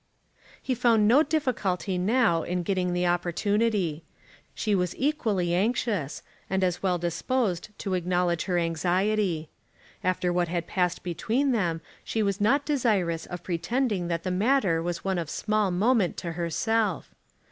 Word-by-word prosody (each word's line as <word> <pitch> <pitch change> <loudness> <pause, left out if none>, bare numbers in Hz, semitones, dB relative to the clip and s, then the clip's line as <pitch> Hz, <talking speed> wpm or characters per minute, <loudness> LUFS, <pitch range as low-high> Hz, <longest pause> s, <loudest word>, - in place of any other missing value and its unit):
He 260 - -2
found 230 -3 +3
no 255 +7 +6
difficulty 215 - -1
now 205 -3 +3
in 180 +2 -2
getting 180 0 0
the 175 0 0
opportunity. 175 0 0 0.5
She 215 - 0
was 180 -3 0
equally 220 - 0
anxious, 200 - 0 0.3
and 190 0 0
as 180 -2 0
well 185 -2 +1
disposed 180 +3 -1
to 195 - -3
acknowledge 180 -1 0
her 180 -2 0
anxiety. 175 +1 0 0.5
After 180 -1 0
what 175 0 +1
had 170 0 -2
passed 180 -1 -1
between 230 - 0
them 175 -8 0 0.2
she 220 - -1
was 200 0 -1
not 275 +7 +3
desirous 205 - 0
of 175 -1 -7
pretending 190 +3 -1
that 170 -1 -2
the 185 - -2
matter 195 -4 +2
was 170 0 -3
one 190 -2 0
of 165 -3 -4
small 215 +1 0
moment 200 +1 +2
to 170 - -4
herself. 185 +4 -1
185 Hz, 145 wpm, -27 LUFS, 175-220 Hz, 0.5 s, no